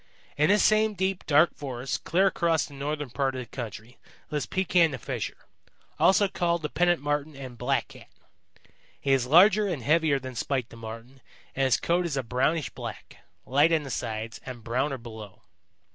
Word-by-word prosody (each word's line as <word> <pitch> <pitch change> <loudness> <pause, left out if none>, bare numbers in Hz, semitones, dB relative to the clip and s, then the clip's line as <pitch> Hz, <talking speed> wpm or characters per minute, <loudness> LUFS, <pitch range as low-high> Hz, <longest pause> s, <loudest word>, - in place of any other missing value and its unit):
"In 150 +3 +2
this 205 +1 +4
same 215 0 +3
deep, 190 0 -2
dark 150 +2 +5
forest 130 -2 -5
clear 185 +4 +3
across 170 -4 +2
the 145 - -13
northern 145 -1 -4
part 135 0 -1
of - - -4
the - - -7
country 115 -1 -8 0.3
lives 150 -1 -2
Pekan 180 -3 +3
the 130 - -5
Fisher, 110 - -5 0.5
also 200 +1 +5
called 170 -3 -1
the 150 - -2
Pennant 175 -1 +2
Marten 145 +1 -2
and 130 -3 -8
Blackcat. 125 +3 -2 0.9
He 140 - -1
is 130 -2 +1
larger 195 +8 +6
and 160 -10 -3
heavier 155 +1 +3
than 130 -1 -7
Spite 125 0 -2
the - - -11
Marten 115 +3 -10 0.3
and 135 - +1
his 130 - +3
coat 175 +1 +1
is 145 -4 -3
a 135 - -1
brownish 130 +5 0
black, - - -8 0.3
light 145 +5 +3
on 160 -2 +2
the 135 - -7
sides, 110 0 -4
and 125 -3 -8
browner 130 +5 -1
below. 110 -5 -11
140 Hz, 180 wpm, -27 LUFS, 125-170 Hz, 0.9 s, larger